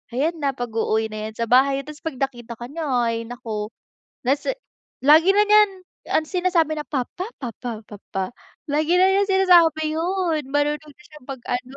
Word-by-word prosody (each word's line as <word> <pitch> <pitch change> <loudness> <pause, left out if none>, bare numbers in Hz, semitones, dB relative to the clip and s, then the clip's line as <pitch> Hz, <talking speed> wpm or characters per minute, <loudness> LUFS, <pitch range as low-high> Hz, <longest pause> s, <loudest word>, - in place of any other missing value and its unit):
ayan 315 +6 +1
na 280 -3 -1
pag-uuwi 225 -2 -1
na 215 0 -5
iyan 220 - -10
sa 230 0 -2
bahay 270 +2 +4
tapos 300 +1 -10
kapag 320 -5 -3
nakita 240 -3 -5
ka 240 +1 -8
niya 325 +1 -4 0.2
ay 230 0 -2
naku, 220 -3 -5 0.6
nasa 285 - 0 0.5
lagi 320 +7 +6
na 415 - +5
niyan 425 -1 +7 0.4
ang 315 - +1
sinasabi 335 -3 0
na 295 - -5
papa, 300 - -3
papa, 235 -3 -6
papa, 195 -1 -6 0.3
lagi 310 +3 +1
na 365 - +5
niya 400 +1 +2
sinasabi 340 -5 +4
'yun, 340 -2 0
marunong 290 +1 0 0.2
na - - -19
siyang 300 -4 -16
mag 265 -3 -7
ano, 250 +2 -4
290 Hz, 175 wpm, -22 LUFS, 240-330 Hz, 0.6 s, niyan